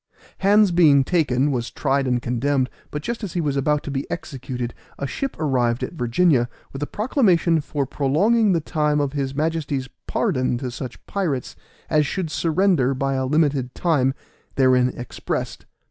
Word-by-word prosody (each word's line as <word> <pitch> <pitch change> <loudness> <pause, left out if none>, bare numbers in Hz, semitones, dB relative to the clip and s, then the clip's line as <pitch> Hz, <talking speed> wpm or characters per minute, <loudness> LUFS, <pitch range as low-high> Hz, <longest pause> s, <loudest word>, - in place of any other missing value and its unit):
Hands 205 0 +5
being 155 -6 +5
taken, 145 -4 +1
was 120 -3 -2
tried 135 -1 0
and 125 -1 +1
condemned, 130 +2 0 0.2
but 150 0 -5
just 235 +3 -4
as 195 - -4
he 175 - -1
was 145 -4 0
about 145 +2 +1
to 145 - -5
be 135 0 -3
executed 130 -6 -5 0.2
a 140 - -3
ship 270 - -3
arrived 125 -6 +1
at - - -4
Virginia 125 -2 +2 0.2
with 135 - -6
a 145 - -1
proclamation 185 - +2
for 145 -1 -2
prolonging 195 - +2
the 170 -3 +2
time 150 -1 0
of 145 -1 -1
his 135 -2 -2
Majesty's 150 -4 -1 0.2
pardon 130 - 0
to 125 0 -4
such 125 +1 -6
of - - -22
the - - -21
pirates 160 -11 -2 0.3
as 150 -2 +2
should 170 -2 -3
surrender 165 -5 +2
by 135 +1 -1
a 130 -1 -1
limited 140 -4 +1
time 135 -6 +1 0.4
therein 130 -1 +4
expressed. 120 - -5
145 Hz, 175 wpm, -22 LUFS, 130-165 Hz, 0.4 s, Hands